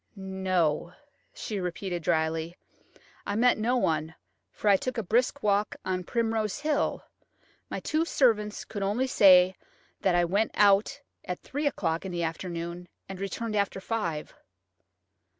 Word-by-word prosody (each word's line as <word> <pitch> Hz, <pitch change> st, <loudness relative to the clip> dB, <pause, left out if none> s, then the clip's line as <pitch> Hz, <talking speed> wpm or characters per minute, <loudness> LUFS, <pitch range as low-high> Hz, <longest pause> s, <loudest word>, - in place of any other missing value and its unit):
"No," 185 Hz, -4 st, -1 dB, 0.4 s
she 210 Hz, -2 st, -5 dB
repeated 180 Hz, 0 st, -3 dB
dryly; 160 Hz, +1 st, -1 dB, 0.7 s
'I 200 Hz, -, -1 dB
met 245 Hz, +1 st, +3 dB
no 240 Hz, +4 st, +1 dB
one, 160 Hz, -6 st, 0 dB, 0.4 s
for -, -, -5 dB
I 200 Hz, -, +7 dB
took 255 Hz, +6 st, -3 dB
a 225 Hz, -, -1 dB
brisk 245 Hz, +7 st, +1 dB
walk 205 Hz, 0 st, +1 dB
on 185 Hz, -1 st, -1 dB
Primrose 225 Hz, +1 st, -1 dB
Hill. 300 Hz, -1 st, 0 dB, 0.7 s
My -, -, -3 dB
two 310 Hz, +1 st, 0 dB
servants 220 Hz, -10 st, +1 dB
could 205 Hz, -, -6 dB
only 205 Hz, +7 st, +1 dB
say 185 Hz, -6 st, +6 dB, 0.5 s
that 185 Hz, -2 st, +2 dB
I 175 Hz, 0 st, +3 dB
went 200 Hz, +6 st, 0 dB
out 205 Hz, +7 st, +4 dB, 0.2 s
at 180 Hz, -, -5 dB
three 290 Hz, +2 st, -2 dB
o'clock 165 Hz, -11 st, -1 dB
that 180 Hz, -3 st, -5 dB
afternoon 170 Hz, +1 st, -4 dB, 0.2 s
and 195 Hz, -1 st, -8 dB
returned 215 Hz, +3 st, -3 dB
after 200 Hz, -1 st, 0 dB
five." 175 Hz, -8 st, -3 dB
195 Hz, 140 wpm, -28 LUFS, 175-225 Hz, 0.7 s, I